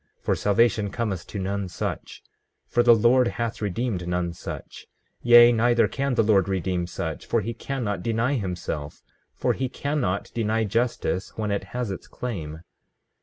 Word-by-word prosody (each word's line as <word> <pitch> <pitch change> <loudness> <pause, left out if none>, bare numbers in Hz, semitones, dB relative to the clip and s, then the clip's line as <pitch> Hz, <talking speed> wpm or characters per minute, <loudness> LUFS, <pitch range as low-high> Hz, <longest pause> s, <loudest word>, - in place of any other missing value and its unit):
For - - 0
salvation 105 0 +2
cometh 100 -5 -3
to - - -6
none 100 0 -2
such; 85 - -5 0.4
for 120 - +2
the 120 -1 +7
Lord 120 +3 +4
hath 115 -2 -3
redeemed 105 -3 -2
none 90 -1 -1
such; - - -8 0.3
yea, 120 0 +8
neither 120 0 +3
can 140 -1 -1
the - - +4
Lord 100 -2 +3
redeem 90 -2 -1
such; 80 -2 -5
for 115 - +1
he 115 +3 -4
cannot 115 -6 -3
deny 115 +6 0
himself; 90 - -4 0.3
for - - +1
he 130 -1 -2
cannot 130 -10 -2
deny 110 -1 0
justice 110 -3 -1
when 105 -2 -1
it 100 - -2
has 125 -5 -2
its 95 - -7
claim. 80 -10 -6
110 Hz, 160 wpm, -25 LUFS, 95-120 Hz, 0.4 s, yea